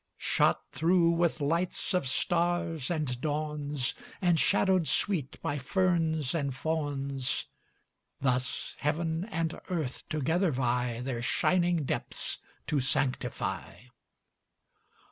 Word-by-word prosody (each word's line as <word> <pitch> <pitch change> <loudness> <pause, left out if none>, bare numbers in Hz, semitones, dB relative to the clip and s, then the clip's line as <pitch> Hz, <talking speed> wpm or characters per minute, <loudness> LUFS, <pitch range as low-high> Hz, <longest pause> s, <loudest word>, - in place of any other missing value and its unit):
Shot - - +2
through 170 +3 +3
with 170 -1 +1
lights 170 +6 0
of 180 -7 +1
stars 170 -1 +1
and 150 -8 -1
dawns, 150 -2 -1 0.3
And 175 -4 +3
shadowed 190 -3 +3
sweet 165 -10 +1
by 145 0 -1
ferns 160 -2 +1
and 140 -5 -1
fawns, 140 -3 -1 0.7
Thus 130 -1 -1
heaven 160 +3 0
and 165 -6 -2
earth 155 -8 -3
together 160 +4 +1
vie 125 -2 0
Their 125 -2 -3
shining 175 +6 +2
depths - - -2 0.3
to 150 -3 +1
sanctify. 130 -2 -2
155 Hz, 105 wpm, -30 LUFS, 135-170 Hz, 0.7 s, through